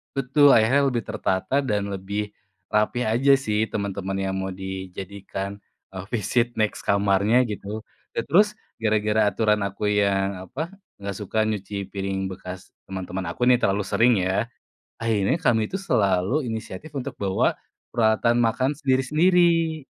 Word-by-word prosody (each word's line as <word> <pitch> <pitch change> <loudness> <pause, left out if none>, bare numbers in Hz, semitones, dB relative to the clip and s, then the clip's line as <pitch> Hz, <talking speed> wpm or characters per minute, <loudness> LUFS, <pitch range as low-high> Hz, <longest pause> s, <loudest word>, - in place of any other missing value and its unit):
Betul 135 +2 +4
akhirnya 130 +6 +4
lebih 120 -4 -1
tertata 95 +9 -1
dan 105 -6 -1
lebih 100 +2 -4 0.4
rapih 110 +4 +1
aja 125 +6 +3
sih 110 -4 0
teman-teman 100 -1 -3
yang 95 0 -1
mau 95 0 -3
dijadikan, 95 +1 -6 0.3
eee, 95 0 -7
visit 120 +2 0
next 110 -1 0
kamarnya 100 +4 +3
gitu. 105 0 -5 0.3
Dan 115 - 0
terus 205 +7 +4 0.2
gara-gara 110 -1 +2
aturan 105 -2 +1
aku 100 +1 -3
yang 100 -2 +1
apa, 155 - -5 0.3
nggak 100 0 -5
suka 105 +2 -5
nyuci 100 -2 -3
piring 95 -1 -2
bekas 90 0 -9 0.2
teman-teman 95 0 -5
aku 120 - -4
nih 125 -1 +6
terlalu 100 +1 +1
sering 120 +1 +3
ya, 95 +5 0 0.5
akhirnya 115 +2 +1
kami 115 -6 +3
itu 195 - -2
selalu 105 - +1
inisiatif 110 +5 -6
untuk 125 - -5
bawa 95 -2 +1 0.4
peralatan 115 0 +3
makan 130 +4 +1
sendiri-sendiri. 160 +4 +2
105 Hz, 140 wpm, -24 LUFS, 95-125 Hz, 0.5 s, nih